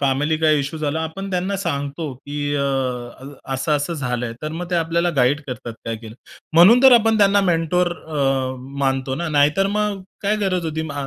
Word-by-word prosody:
Family 145 +3 +1
काही 155 -1 +3
issue 140 +3 -5
झाला, 155 +1 -1
आपण 195 +5 -6
त्यांना 185 +2 -1
सांगतो, 145 -4 -3
की 145 +2 -4
अ, 140 - 0 0.9
असं-असं 145 +4 -1
झालंय. 125 -5 -3
तर 155 - -2
मग 175 +2 -6
ते 180 - 0
आपल्याला 170 +1 +1
गाईड 135 +3 +3
करतात, 125 -2 -6
काय 115 -1 -3
केलं. 110 0 -11 0.4
म्हणून 190 +10 +7
तर 265 -1 +8
आपण 225 -2 +4
त्यांना 200 0 +4
मेंटर 175 -1 +1
अ, 135 -5 -2 0.2
मानतो 135 -1 0
ना, 170 +4 -3
नाहीतर 150 +5 +3
मग 205 -1 -1 0.2
काय 210 +1 +1
गरज 185 -4 -1
होती 160 0 -3
म 140 -1 -4
155 Hz, 180 wpm, -21 LUFS, 140-180 Hz, 0.9 s, तर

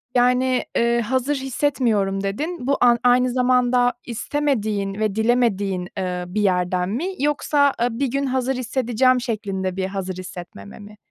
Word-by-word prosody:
Yani, 250 +1 +3
eee, 235 0 +2
"Hazır 260 +5 0
hissetmiyorum." 240 -8 0
dedin. 275 - -3
Bu 280 - +2
a 240 -1 +5
aynı 250 +1 +4
zamanda 250 0 +2
istemediğin 220 -5 -1
ve 215 -2 0
dilemediğin, 205 -6 +1
eee, 180 -1 -3
bir 210 +4 -2
yerden 180 -1 +1
mi 255 - -2
yoksa, 285 -1 +2
eee, 240 - +3
bir 270 +4 -1
gün 275 +3 -1
hazır 260 0 -1
hissedeceğim 255 0 +1
şeklinde 195 -6 -3
bir 190 0 -1
hazır 190 -1 -4
hissetmeme 175 - -9
mi? 210 0 -13
240 Hz, 145 wpm, -22 LUFS, 195-255 Hz, -, a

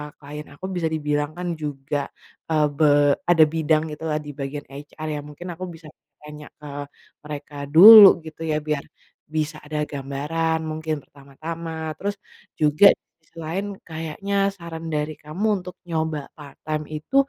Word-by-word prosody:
klien 150 +1 -9
aku 185 - -8
bisa 175 -3 -1
dibilang 150 -1 -1
kan 180 0 -4
juga, 145 -1 -3 0.4
eee, 155 -1 +3
be 145 -2 +4
ada 165 -2 +7
bidang 155 -1 +2
gitulah 150 0 -2
di 145 - -7
bagian 140 +1 -4
HR 145 +2 -8
yang 145 - -9
mungkin 150 +5 -10
aku 185 - -5
bisa 160 -1 -13 0.4
tanya 150 0 -10
ke 150 - -12 0.6
mereka 150 -1 -8
dulu 200 +7 +11 0.2
gitu 160 +1 -7
ya, 155 -1 +1
biar 150 -2 -2 0.4
bisa 155 0 -2
ada 150 0 -2
gambaran 150 +3 -2
mungkin 155 -2 -3
pertama-tama. 160 +3 -7
Terus 200 +1 -2 0.4
juga 150 +6 +4
di - - -62 0.2
sisi 160 +1 -35
lain 185 +6 -2 0.2
kayaknya 165 +5 -5 0.2
saran 165 -2 -8
dari 150 0 -2
kamu 155 +9 -3
untuk 180 0 -9
nyoba 160 -4 -3
part 145 -2 -12
time 155 -1 -3
itu, 155 - -7
155 Hz, 155 wpm, -23 LUFS, 150-165 Hz, 0.6 s, dulu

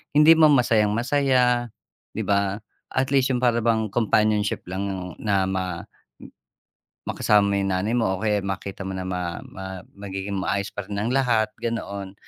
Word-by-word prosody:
hindi 150 +2 +7
man 155 -2 +6
masayang-masaya, 120 +1 +2 0.4
'di - - -2
ba, 100 0 +1 0.3
at 130 0 +1
least 135 -1 +3
yung 125 - -2
para 120 -1 +3
bang 110 -2 +1
companionship 110 -2 +1
lang 95 +2 -3 0.3
na 100 -3 +1
ma 90 -2 -3 1.2
makasama 100 -1 +2
yung 95 0 -1
nanay 100 +5 -1
mo. 115 - +2
O - - -9
kaya 105 -1 +1
makita 95 0 -5
mo 95 - -4
na 95 - -4
ma 90 -2 -3
ma 95 -1 -8 0.2
magiging 100 0 -5
maayos 100 +1 -1
pa 105 - -4
rin 100 - -6
ang 115 +4 -1
lahat, 120 -5 +2
ganoon. 100 -4 -4
105 Hz, 155 wpm, -24 LUFS, 95-120 Hz, 1.2 s, hindi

